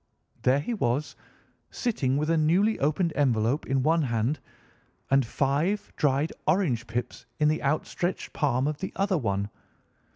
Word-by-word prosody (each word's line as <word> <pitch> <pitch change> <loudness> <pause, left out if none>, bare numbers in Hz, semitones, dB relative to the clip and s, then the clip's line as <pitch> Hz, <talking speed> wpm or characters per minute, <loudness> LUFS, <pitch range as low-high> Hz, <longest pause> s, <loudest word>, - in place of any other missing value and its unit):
There 130 +3 +3
he 235 - -3
was, 140 - -1 0.5
sitting 140 - 0
with 150 +2 0
a - - +3
newly 180 +8 +3
opened 155 +4 +1
envelope 125 0 +1
in 135 -1 +1
one 165 +3 +3
hand 120 +2 0 0.7
and 135 0 +5
five 150 - 0
dried 145 +2 +1
orange 130 - +1
pips 120 +3 -4
in 150 -1 +3
the 155 - 0
outstretched 155 +5 -2
palm 135 -3 +1
of 150 0 -2
the 190 - -5
other 195 -3 +1
one. 100 -4 -1
145 Hz, 150 wpm, -27 LUFS, 130-165 Hz, 0.7 s, and